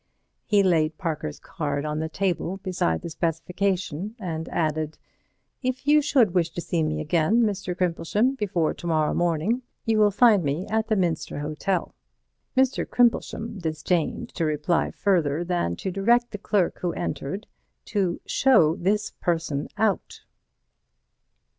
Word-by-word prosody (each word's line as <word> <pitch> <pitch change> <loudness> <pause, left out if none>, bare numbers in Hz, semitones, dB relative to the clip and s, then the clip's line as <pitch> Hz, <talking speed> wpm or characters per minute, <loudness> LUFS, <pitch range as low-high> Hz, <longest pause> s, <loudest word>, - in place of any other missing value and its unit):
He 205 -2 +4
laid 160 -4 +2
Parker's 155 -4 -3
card 145 -3 -3
on 150 0 -2
the 160 0 -2
table 185 +1 -1
beside 180 - -1
the - - -4
specification, 180 +3 -2
and 165 -5 -4
added: 155 -1 -1 0.6
"If 255 0 -2
you 300 +1 +5
should 255 -10 +3
wish 175 -2 +2
to - - -3
see 170 -1 -1
me 155 0 -1
again, 170 +9 +2
Mr. 195 -4 -2
Crimplesham, 185 +8 +1
before 185 -9 0
to 175 - -8
morrow 155 -2 +2
morning, 175 +8 +1 0.2
you 225 -2 +2
will 210 -1 +6
find 210 -2 +5
me 145 +6 -1
at 220 0 +1
the 220 - +2
Minster 175 -7 -1
Hotel." 155 +5 -2 0.6
Mr. 265 0 +3
Crimplesham 230 -2 +1
disdained 160 0 -1
to 170 - -3
reply 155 +2 +1
further 170 -5 +1
than 175 - -1
to 190 - -4
direct 235 +6 +2
the 205 - -6
clerk 195 -3 0
who 175 -1 -1
entered 150 +8 -4 0.4
to 190 -5 -1
"show 215 - +4
this 205 +4 0
person 165 -4 -2
out." 215 -3 0
175 Hz, 145 wpm, -25 LUFS, 155-210 Hz, 0.6 s, will